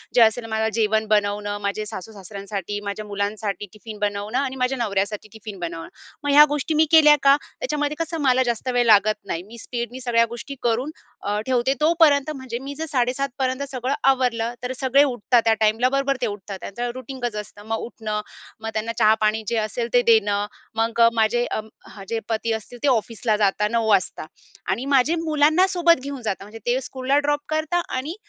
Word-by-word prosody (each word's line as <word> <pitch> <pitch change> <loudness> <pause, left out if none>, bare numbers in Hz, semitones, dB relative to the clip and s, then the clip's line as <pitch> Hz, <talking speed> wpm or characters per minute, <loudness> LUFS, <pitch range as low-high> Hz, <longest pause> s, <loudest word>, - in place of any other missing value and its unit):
जे 240 - +6
असेल 225 +1 +4
माझं 220 0 0
जेवण 220 -1 +1
बनवणं, 205 -1 0
माझे 200 +1 -2
सासू-सासऱ्यांसाठी 200 0 -6
माझ्या 200 +1 -4
मुलांसाठी 205 0 -3
टिफिन 215 0 -10
बनवणं 205 +3 -2
आणि 265 -1 -2
माझ्या 255 +1 0
नवऱ्यासाठी 210 -2 -2
टिफिन 215 -3 -9
बनवणं. 165 -1 -5 0.4
मग 290 - 0
ह्या 295 +1 +9
गोष्टी 295 +2 -1
मी 315 +1 +5
केल्या 300 -2 +8
का 275 0 +7 0.2
त्याच्यामध्ये 300 -10 -2
कसं 330 -1 -3
मला 260 -1 +3
जास्त 240 +1 -3
वेळ 245 -1 +3
लागत 215 -1 +5
नाही. 170 +2 -4
मी 235 +2 -12
स्पीडनी 240 +2 -5
सगळ्या 230 -1 +3
गोष्टी 240 +4 -7
करून 240 +4 0 0.6
ठेवते 260 +1 +1
तोपर्यंत 310 -3 +4
म्हणजे 260 -3 -5
मी 275 +2 -7
जर 320 +2 -4
07:30पर्यंत 260 0 -1
सगळं 255 +1 -2 0.2
आवरलं 240 -3 +1
तर 250 - -2
सगळे 275 +1 +4
उठतात 245 -3 +2
त्या 225 - +5
टाईमला, 220 +3 +3
बरोबर 275 0 +1
ते 240 - +1
उठतात 205 -1 -6
त्यांचं 240 +4 -4
रूटीन 260 +1 -8
कच 235 -3 -2
असतं 205 0 -8
मग 225 0 -1
उठणं 215 -2 -4 0.4
मग 225 - -4
त्यांना 220 +1 -2
चहा 215 -1 +6
पाणी 215 +1 +1
जे 235 - 0
असेल 220 +2 -2
ते 245 - +6
देणं, 205 -2 +4 0.3
मग 230 +1 0
माझे 230 +2 +2 0.6
जे 230 - -1
पती 225 0 -1
असतील 220 +2 -7
ते - - +2
ऑफिसला 225 -2 +1
जातात, 210 0 +1
09:00 230 -1 +1
वाजता 185 -5 +1 0.5
आणि 250 - -2
माझे 280 +4 +3
मुलांना 310 +3 +4
सोबत 345 -5 +3
घेऊन 280 -2 -6
जातात 200 -3 -3
म्हणजे 220 +2 -11
ते 245 +2 +2
स्कूलला 265 +2 -1
ड्रॉप 290 0 0
करतात 315 +3 0
आणि 295 +7 -4
235 Hz, 180 wpm, -23 LUFS, 215-270 Hz, 0.6 s, ह्या